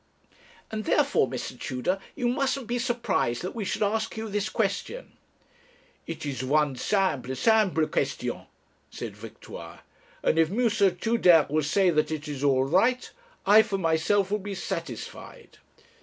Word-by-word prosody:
'And 215 -1 -4
therefore, - - +3
Mr. - - -6
Tudor, 130 +10 -2 0.2
you 245 -4 -1
mustn't 270 +1 0
be 240 +2 -2
surprised 235 - -1
that 185 - -4
we 225 - -4
should 200 - -1
ask 220 +2 -1
you 220 0 -4
this 205 0 -1
question.' - - -2 1.0
'It 160 -2 -6
is 130 -3 -3
one 145 +1 +2
simple, 145 -7 0
simple 200 - +3
question,' - - -2 0.4
said - - -7
Victoire, - - -10 0.4
'and 160 - +2
if 160 -1 +4
M. 235 +5 +1 0.3
Tudere 180 -7 +4
will 155 +1 +2
say 180 +5 +2
that 155 -1 +1
it 155 -1 -4
is 145 -2 -5
all 135 -2 +3
right, 210 - +2 0.3
I, 210 +2 +8
for 210 -2 -2
myself, 185 +3 +1
will 210 - +1
be 200 0 -6
satisfied.' 465 - -7
195 Hz, 150 wpm, -27 LUFS, 155-225 Hz, 1.0 s, I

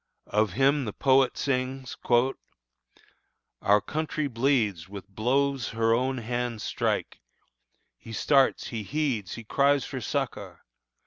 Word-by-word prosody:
Of 105 -3 +2
him 135 +3 +3
the 105 - -4
poet 130 -2 +3
sings: 130 -1 -2 1.7
"Our 100 +1 +4
country 155 +5 -2
bleeds 115 - 0
With 100 -1 -9
blows 130 +6 0
her 115 0 +1
own 130 +3 0
hands 120 -1 -3
strike. - - -2 0.8
He 115 - -11
starts, 135 +4 +2
he 115 -2 -4
heeds 125 -4 -2
Her 115 - -8
cries 140 +4 +2
for - - -5
succor. - - -4
125 Hz, 120 wpm, -27 LUFS, 110-135 Hz, 1.7 s, Our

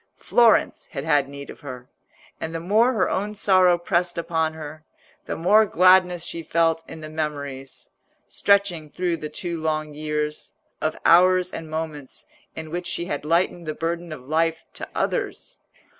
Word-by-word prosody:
Florence 235 -2 +3
had 135 - -4
had 145 -3 +2
need 140 0 -9
of - - -14
her, 125 -3 -9 0.5
and 160 +1 -5
the - - -2
more 215 +9 +3
her 190 -6 +1
own 210 +2 -2
sorrow 185 -3 +4
pressed 175 0 0
upon 160 -2 -1
her, 155 0 -9 0.4
the - - -3
more 205 +6 +5
gladness 185 -2 +4
she 170 - -3
felt 165 0 +1
in 160 - -9
the 155 - -7
memories, 145 -4 -5 0.4
stretching 200 -6 +1
through 175 +2 -1
the 155 -2 -6
two 170 -1 -4
long 155 -1 -2
years, 150 0 -3 0.3
of 155 - -1
hours 180 +1 +5
and 160 -1 -7
moments 155 -3 -5 0.3
in 160 -1 -7
which 175 +1 -3
she 170 - -2
had 145 -3 -4
lightened 170 +1 0
the 155 - -3
burden 170 +1 -3
of 130 -4 -9
life 165 +1 0
to - - -7
others. - - -2
165 Hz, 165 wpm, -23 LUFS, 155-180 Hz, 0.5 s, more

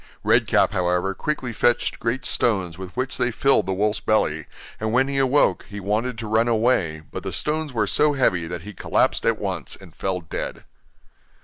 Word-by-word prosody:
Red - - +3
Cap, - - +3
however, 90 +1 0
quickly 130 -1 -3
fetched 120 +2 +1
great 125 +3 -2
stones 95 -8 +1
with 95 +1 -7
which 130 0 -2
they 120 - +2
filled 125 -3 +2
the 95 - 0
wolf's 105 +2 0
belly, 80 -8 0 0.3
and 110 0 -1
when 130 +3 +3
he 140 0 -1
awoke, 135 +2 +2
he 100 -1 -6
wanted 110 +5 -1
to 115 -1 -5
run 110 +2 +2
away, 110 -9 +1
but - - -5
the - - -5
stones 155 0 -2
were 110 -4 +1
so 150 +8 +3
heavy 90 -11 +1
that 85 -1 -6
he 105 +2 -8
collapsed - - +1
at - - +3
once, - - -3
and - - -15
fell 95 -1 -2
dead. 80 -2 -6
110 Hz, 195 wpm, -23 LUFS, 95-125 Hz, 0.3 s, Red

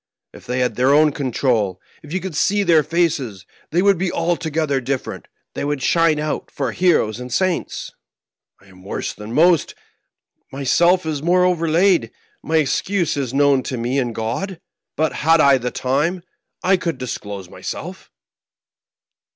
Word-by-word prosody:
If - - -14
they 125 +1 -1
had 125 -4 -1
their 130 +3 +4
own 155 0 +5
control 125 - 0
— - - -31
^if 150 - -12
you 185 - -1
could 185 -4 -6
see 205 +7 +2
.their 165 -5 +5
faces, 150 - -1 0.2
they 175 +4 +1
would 200 -3 +4
be 185 -1 0
altogether 160 -4 -1
different, 130 +1 -4 0.3
they - - -4
would 145 -2 -2
shine 165 -2 +3
out 150 0 -3
for 135 -4 -3
heroes 125 - +2
and 125 0 -8
saints! 185 +7 -1 0.7
I - - -23
am 95 -1 -18
worse 100 - -4
than 105 +1 -9
most; 170 +4 +3 0.8
myseW 170 +7 +2
is 155 -3 -2
more 180 +3 +3
overlaid; 175 +1 +2 0.3
my 160 - 0
excuse 170 +4 0
is 135 -4 -2
known 140 -1 +3
to 130 - -4
me 120 +4 -1
and 120 -3 -2
God. 160 - -3 0.4
But 155 0 0
had 165 +2 +3
I 140 -3 +5
the 125 0 -2
time, 150 +9 -1 0.4
I 190 +1 +4
could 170 -5 -3
disclose 105 -6 -6
myself." - - -7
150 Hz, 160 wpm, -20 LUFS, 125-170 Hz, 0.8 s, own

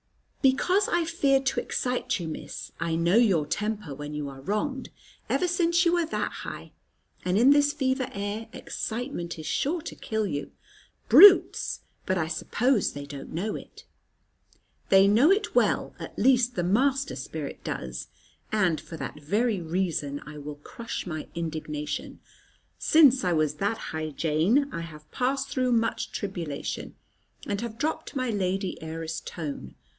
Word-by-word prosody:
"Because 360 +9 +3
I 345 - +2
feared 275 -5 +2
to 270 - +1
excite 250 -5 -1
you, 170 - -4
Miss. 160 - -7
I 165 -1 -1
know 170 +5 +3
your 195 -10 +4
temper 210 -2 -3
when 145 +2 -6
you 150 -1 -3
are 135 -1 -10
wronged, 260 - -2 0.4
ever 360 - +2
since 345 0 +2
you 340 - +4
was 340 -2 +1
that - - -1
high; - - -8 0.5
and 180 +1 +1
in 250 +5 +6
this 290 0 +5
fever 265 -3 0
air, 205 +3 -4
excitement 225 -8 -4
is 155 - -8
sure 320 - 0
to - - -6
kill 220 -1 -2
you. 145 -7 -4 0.6
Brutes! 400 -1 +7 0.3
But 185 - +1
I 160 -2 0
suppose 230 +8 +1
they 145 0 -6
don't 140 -1 -8
know 195 +7 -2
it." - - -11 1.0
"They 195 0 +7
know 230 +10 +5
it 405 +2 +2
well; - - +2
at - - -8
least 250 -1 +3
the 175 - 0
master 265 +9 +1
spirit 145 +3 -6
does. 65 0 -5 0.4
And 185 -7 +2
for 165 - -9
that 150 - -6
very 205 +6 +1
reason 160 -4 -2
I 150 0 -9
will 145 0 -7
crush 230 - -6
my 155 -4 -5
indignation. 155 -3 -4 0.6
Since 280 -6 +6
I 180 -1 +2
was 155 -2 +1
that 205 +6 0
high, 155 0 -4
Jane, 170 - +1
I 170 - -3
have 155 -2 -11
passed 270 +2 0
through 255 -3 +1
much 230 0 0
tribulation, 175 -8 -4 0.5
and 200 0 -2
have 230 -1 -5
dropped 310 +3 -2
my 255 -3 0
lady 195 -1 -1
heiress 160 0 -4
tone. 145 - -6
200 Hz, 160 wpm, -27 LUFS, 160-260 Hz, 1.0 s, Brutes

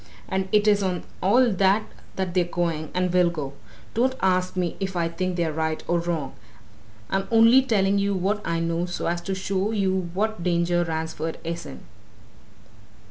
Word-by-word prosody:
And 190 0 -2
it 210 0 +3
is 205 -1 +4
on 185 -3 -1 0.2
all 235 +6 +4
that 195 +2 +3 0.3
that 190 -2 -2
they're 180 -1 +3
going, 170 -3 -2
and 180 0 0
will 180 -1 +4
go. 150 -5 -5 0.4
Don't 255 +3 +1
ask 185 -1 +1
me 180 -2 -1
if 190 -1 -3
I 170 -1 +1
think 180 +2 -2
they're 170 -3 0
right 160 0 -2
or 175 0 +2
wrong! 165 -5 -3 0.8
I'm 195 0 0
only 230 +3 +6
telling 200 -6 +2
you 200 0 +1
what 200 +3 0
I 165 -1 -1
know 165 +1 -1
so 175 - -4
as 170 0 -1
to 190 +2 -3
show 190 +1 -1
you 190 -4 0
what 215 -1 -1
danger 175 0 +1
Ransford 160 -1 -3
is 170 0 -4
in." - - -10
180 Hz, 180 wpm, -24 LUFS, 170-195 Hz, 0.8 s, only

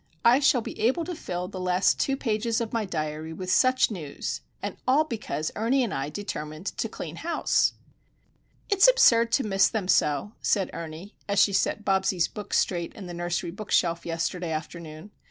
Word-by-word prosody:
I 240 +3 +7
shall 280 -3 +4
be - - -8
able 260 +9 +1
to 360 - -4
fill 180 - -4
the 185 -1 -7
last 180 +1 +2
two 270 0 +1
pages 230 -1 0
of 230 -2 -4
my 225 -2 0
diary 155 -2 -4
with 185 +2 -4
such 255 -2 +4
news,—and 155 -8 -6
all 275 +4 +5
because 220 - -4
Ernie 245 +5 +2
and 225 - -2
I 135 +1 -2
determined 155 -2 -6
to 225 - -1
clean 165 -5 -7
house! 335 0 +1 0.9
"It's 400 +2 +5
absurd 235 - +5
to 270 - +3
miss 195 -2 +3
them 215 -5 -3
so," 150 +2 +2
said 195 -3 +1
Ernie, 165 +5 -8 0.2
as 200 - 0
she 200 - +5
set 210 +2 0
Bobsie's 190 -2 +2
books 210 -2 -3
straight 175 -2 -1
in 200 - -8
the 175 - -7
nursery 175 0 -2
book 205 +3 -9
shelf 170 -1 +2
yesterday 165 +1 -2
afternoon. 160 +3 -6
195 Hz, 180 wpm, -26 LUFS, 170-230 Hz, 0.9 s, I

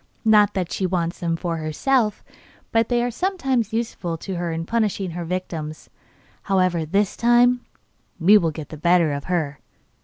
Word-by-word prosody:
Not 210 -2 +5
that 180 -3 -2
she 190 - -1
wants 170 -1 -2
them 170 -1 -1
for 170 0 -3
herself, 210 - 0 0.5
but 225 0 +2
they 240 -1 +2
are 245 - -1
sometimes 265 - -1
useful 220 -7 -3
to 190 +4 -6
her 175 -1 -2
in 165 0 -3
punishing 205 -4 -1
her 175 +1 -5
victims. 165 -3 -5 0.5
However, 185 -4 +1
this 200 +4 +1
time 245 +1 +4 0.6
we 190 +5 +6
will 170 -6 +4
get 155 -1 -7
the 155 - -8
better 170 -1 +3
of 140 0 -5
her. 155 -6 -2
185 Hz, 165 wpm, -22 LUFS, 165-225 Hz, 0.6 s, we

